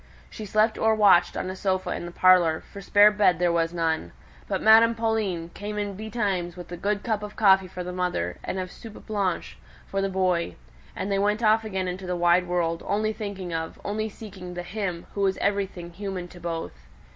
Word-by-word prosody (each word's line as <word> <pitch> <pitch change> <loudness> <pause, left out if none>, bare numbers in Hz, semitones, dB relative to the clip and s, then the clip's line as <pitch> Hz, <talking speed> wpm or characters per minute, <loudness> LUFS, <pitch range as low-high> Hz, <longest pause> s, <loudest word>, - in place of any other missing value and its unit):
She 215 - -7
slept 215 +2 +2
or 220 0 +3
watched 205 -5 +5
on - - -3
a - - -6
sofa 185 -1 -1
in 175 - -4
the - - -8
parlour, 175 -3 +4
for 200 - -11
spare 205 +2 +6
bed 205 -5 +3
there 175 0 +2
was 165 -1 +1
none; 160 - -1 0.3
but - - -1
Madame 225 +1 +6
Pauline 215 -7 -1
came 210 +1 -6
in 205 -1 -2
betimes 200 -5 -2
with 175 -1 -9
a - - -4
good 205 +3 -1
cup 220 -3 -1
of 210 0 -7
coffee 190 -3 +5
for 180 0 -6
the 180 0 -6
mother, 180 - -2
and - - -3
of 185 -1 -4
"soupe 225 -3 -12
blanche" 200 -4 -2 0.3
for 195 - -2
the 195 - 0
boy; 185 -3 0 0.4
and 200 - -3
they 195 - +1
went 210 +3 +1
off 220 +1 +4
again 190 -4 -3
into 185 +1 -5
the 180 - -1
wide 175 +1 +3
world, 170 -2 0
only 215 +1 0
thinking 200 -4 -5
of, 160 0 -4
only 215 +2 -2
seeking 185 -4 -9
the 175 - -4
"him," 180 -3 -4
who 200 - -3
was 195 -1 +2
everything 195 -4 -2
human 190 -1 -5
to 175 - -13
both. 165 - -6
190 Hz, 210 wpm, -25 LUFS, 175-210 Hz, 0.4 s, spare